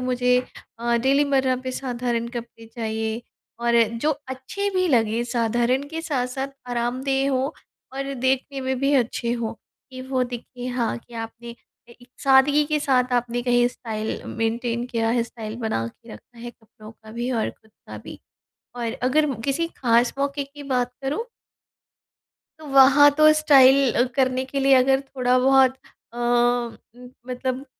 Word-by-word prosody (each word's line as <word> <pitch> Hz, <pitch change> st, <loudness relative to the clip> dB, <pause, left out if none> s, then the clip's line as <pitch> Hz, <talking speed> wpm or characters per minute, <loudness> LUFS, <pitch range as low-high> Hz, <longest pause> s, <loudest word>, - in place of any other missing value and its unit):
मुझे 250 Hz, 0 st, +2 dB, 0.4 s
अ, 235 Hz, 0 st, +1 dB
डेली 275 Hz, +4 st, +3 dB
मर्रा 265 Hz, -2 st, +1 dB
पे 255 Hz, -, -2 dB
साधारण 245 Hz, -2 st, -2 dB
कपड़े 235 Hz, -1 st, -8 dB
चाहिए। 220 Hz, 0 st, -4 dB, 0.4 s
और 235 Hz, 0 st, +2 dB, 0.3 s
जो 305 Hz, -, +3 dB, 0.2 s
अच्छे 265 Hz, +11 st, -4 dB
भी 370 Hz, 0 st, +2 dB
लगें, 230 Hz, -4 st, +2 dB
साधारण 240 Hz, +2 st, 0 dB
के 320 Hz, +2 st, -5 dB
साथ-साथ 265 Hz, -3 st, -2 dB, 0.2 s
आरामदेह 260 Hz, +3 st, 0 dB
हों 265 Hz, +2 st, 0 dB, 0.5 s
और 275 Hz, 0 st, -3 dB
देखने 265 Hz, +2 st, -1 dB
में 260 Hz, 0 st, -2 dB
भी 275 Hz, +2 st, +1 dB
अच्छे 235 Hz, -2 st, 0 dB
हों। 235 Hz, -2 st, -3 dB, 0.4 s
कि 255 Hz, 0 st, -8 dB
वो 260 Hz, -1 st, +1 dB
दिखें 245 Hz, +1 st, -7 dB
हाँ 240 Hz, -2 st, -1 dB
कि 235 Hz, 0 st, -17 dB
आपने 230 Hz, +1 st, -7 dB, 0.4 s
एक 245 Hz, +1 st, -18 dB, 0.2 s
सादगी 275 Hz, +2 st, +5 dB
के 305 Hz, 0 st, 0 dB
साथ 255 Hz, -3 st, +1 dB
आपने 245 Hz, 0 st, 0 dB
कहीं 245 Hz, 0 st, +3 dB
स्टाइल 220 Hz, -3 st, -5 dB
मेंटेन 235 Hz, +1 st, -2 dB
किया 230 Hz, -2 st, -1 dB
है, 235 Hz, 0 st, +2 dB
स्टाइल 225 Hz, -1 st, -7 dB
बना 220 Hz, -, -1 dB
के 115 Hz, -, -15 dB
रखा 235 Hz, -, -15 dB
है 240 Hz, +1 st, -7 dB
कपड़ों 215 Hz, -2 st, -16 dB
का 220 Hz, -1 st, -16 dB
भी 240 Hz, +2 st, -3 dB
और 230 Hz, -3 st, -1 dB
ख़ुद 220 Hz, -, -26 dB, 0.2 s
का -, -, -8 dB
भी। -, -, -9 dB, 0.6 s
और 235 Hz, -2 st, -3 dB
अगर 295 Hz, +5 st, +3 dB, 0.2 s
किसी 290 Hz, +5 st, 0 dB
खास 240 Hz, -1 st, +2 dB
मौके 280 Hz, 0 st, -1 dB
की 285 Hz, +1 st, -12 dB
बात 250 Hz, -1 st, 0 dB
करूँ 290 Hz, +12 st, -2 dB, 1.4 s
तो 310 Hz, -, -11 dB
वहाँ 275 Hz, +1 st, +7 dB
तो 310 Hz, 0 st, +7 dB
स्टाइल 275 Hz, -4 st, +5 dB
अ, 240 Hz, -, +3 dB
करने 260 Hz, -1 st, +1 dB
के 275 Hz, +1 st, -3 dB
लिए 275 Hz, 0 st, +4 dB
अगर 265 Hz, +1 st, +4 dB
थोड़ा 255 Hz, -2 st, 0 dB
बहुत 265 Hz, 0 st, +4 dB, 0.4 s
अ, -, -, -10 dB
उम, 240 Hz, 0 st, -1 dB, 0.2 s
मतलब 255 Hz, +1 st, -3 dB
250 Hz, 160 wpm, -23 LUFS, 235-270 Hz, 1.4 s, वहाँ